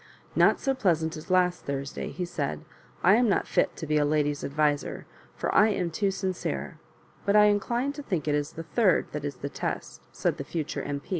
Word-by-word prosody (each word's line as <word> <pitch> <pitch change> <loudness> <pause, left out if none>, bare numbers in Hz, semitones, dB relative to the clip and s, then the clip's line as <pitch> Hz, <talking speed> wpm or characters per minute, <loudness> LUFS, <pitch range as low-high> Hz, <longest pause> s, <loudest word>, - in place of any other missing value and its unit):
*' - - -28
Not - - +3
so 270 - +1
pleasant 165 -10 +1
as 155 +3 -10
last 180 -1 +2
Thursday," 140 0 -4
he 180 - -4
said. 80 - -3 0.4
"I 185 - +7
am 240 -2 +3
not - - +2
fit - - +1
to 160 - -6
be 150 0 +1
a 150 - +3
lady's 145 0 +1
adviser, 145 0 0 0.3
for - - -2
I 215 - +6
am 180 -5 -1
too 200 +4 +1
sincere; 170 - -3 0.4
but 200 - +2
I 210 - +8
incline 235 +6 +1
to 290 - -7
think 180 - -2
it 150 - +2
is 145 0 -1
the 165 - -6
third 190 +3 +2
that 150 -1 -4
is 145 -2 -3
the 140 - -5
test," - - -4
said - - -1
the - - -4
future 160 -4 -3
M. 140 -1 -4
165 Hz, 215 wpm, -27 LUFS, 145-200 Hz, 0.4 s, I